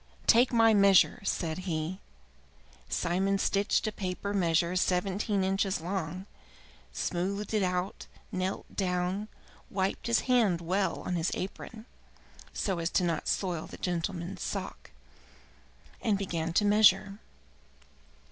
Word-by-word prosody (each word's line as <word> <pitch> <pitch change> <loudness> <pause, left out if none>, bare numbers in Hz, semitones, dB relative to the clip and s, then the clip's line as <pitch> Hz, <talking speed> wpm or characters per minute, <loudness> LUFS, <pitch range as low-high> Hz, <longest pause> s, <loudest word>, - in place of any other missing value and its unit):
"Take 240 +2 +5
my 225 -2 +5
measure!" 200 -2 +5
said 165 -3 -2
he. 160 +3 -2 0.9
Simon 185 - +1
stitched 200 +1 +1
a 215 - 0
paper 200 0 -4
measure 170 -2 +1
seventeen 195 +2 0
inches 195 +1 0
long, 180 +1 -4 0.7
smoothed 195 +4 -2
it 215 - +2
out, 180 0 -2 0.2
knelt 185 +1 -2
down, 185 +2 -1 0.4
wiped 190 +2 -2
his 235 - +3
hand 230 -9 +2
well 180 +1 -1
on 180 - -2
his 165 +2 0
apron 220 +3 -6 0.7
so 190 -4 -2
as 165 +3 +1
not 170 -3 -1
to - - +1
soil 175 -5 -2
the - - -10
gentleman's 175 +1 -3
sock, - - -5 1.1
and 210 -3 +1
began 170 -4 -2
to 205 - +3
measure. 205 -1 +4
190 Hz, 120 wpm, -29 LUFS, 175-200 Hz, 1.1 s, Take